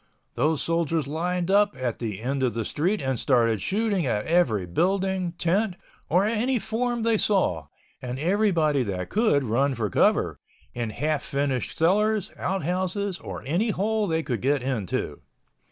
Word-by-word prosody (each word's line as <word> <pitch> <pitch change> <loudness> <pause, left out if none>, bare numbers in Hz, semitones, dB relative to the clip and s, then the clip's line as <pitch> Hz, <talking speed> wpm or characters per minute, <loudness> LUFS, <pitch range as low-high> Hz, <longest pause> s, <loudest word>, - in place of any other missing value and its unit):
Those 150 +5 +1
soldiers 165 -2 0
lined 175 +5 -1
up 205 +1 +4
at 125 -3 -3
the 110 -4 -4
end 135 +2 -1
of 125 -3 0
the 115 -2 -2
street 180 +6 -1
and 130 -3 -1
started 115 -6 +2
shooting 200 - 0
at 105 -3 -1
every 140 - +2
building, 185 - 0
tent, 180 +3 0 0.3
or 180 +4 +3
any 230 +4 +1
form 240 +1 -2
they 225 -2 +2
saw, 90 - +1 0.3
and 125 0 -4
everybody 165 -4 +2
that 95 -6 -3
could 210 -10 +3
run 130 +4 +1
for 110 -5 -2
cover—in 120 +6 -1
half 150 +6 -1
finished 140 -2 -2
cellars, 210 +4 +2
out 190 -2 -2
houses 185 +3 -1
or - - -7
any 175 - 0
hole 210 +1 0
they 160 -1 0
could 120 -7 -3
get 135 0 +1
into. 125 -8 -2
165 Hz, 155 wpm, -25 LUFS, 130-200 Hz, 0.3 s, up